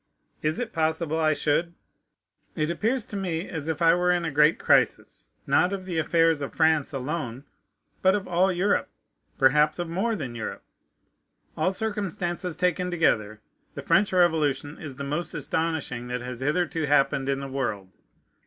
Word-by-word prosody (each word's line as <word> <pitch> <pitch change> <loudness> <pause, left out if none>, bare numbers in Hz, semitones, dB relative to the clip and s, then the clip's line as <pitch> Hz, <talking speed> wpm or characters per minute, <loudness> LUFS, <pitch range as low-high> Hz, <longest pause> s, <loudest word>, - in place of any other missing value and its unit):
Is 155 +1 0
it 235 -2 -4
possible 160 0 0
I 155 -1 +3
should? 165 +3 0 0.8
It 155 +2 -2
looks 240 +1 +1
to - - -8
me 180 -2 -2
as 160 -4 -5
if 160 0 -1
I 165 0 +6
were 180 +1 +2
in 175 -1 0
a 165 - -2
great 150 +3 +4
crisis, - - +1 0.2
not 180 - +3
of 190 -1 -5
the 175 -3 -2
affairs 165 -1 +2
of 140 - -5
France 160 -3 +2
alone, 135 -2 -4 0.6
but 190 +1 +4
of 205 -1 -3
all 180 +2 +2
Europe, 185 +3 +1 0.5
perhaps 150 +3 +4
of 175 -1 -4
more 210 +7 0
than 130 - -5
Europe. 115 -2 -6 0.9
All 160 +4 +1
circumstances 190 -4 -3
taken 180 +1 0
together, 110 -11 0 0.3
the - - -6
French 200 +1 +3
Revolution 155 -5 +1
is 145 -4 -8
the 140 - -6
most 150 +5 -2
astonishing 160 -7 -2
that 125 0 -3
has 125 -1 -6
hitherto 155 +2 0
happened 140 -1 +2
in 135 0 0
the 140 - -5
world. 110 -9 -4
160 Hz, 165 wpm, -26 LUFS, 140-180 Hz, 0.9 s, I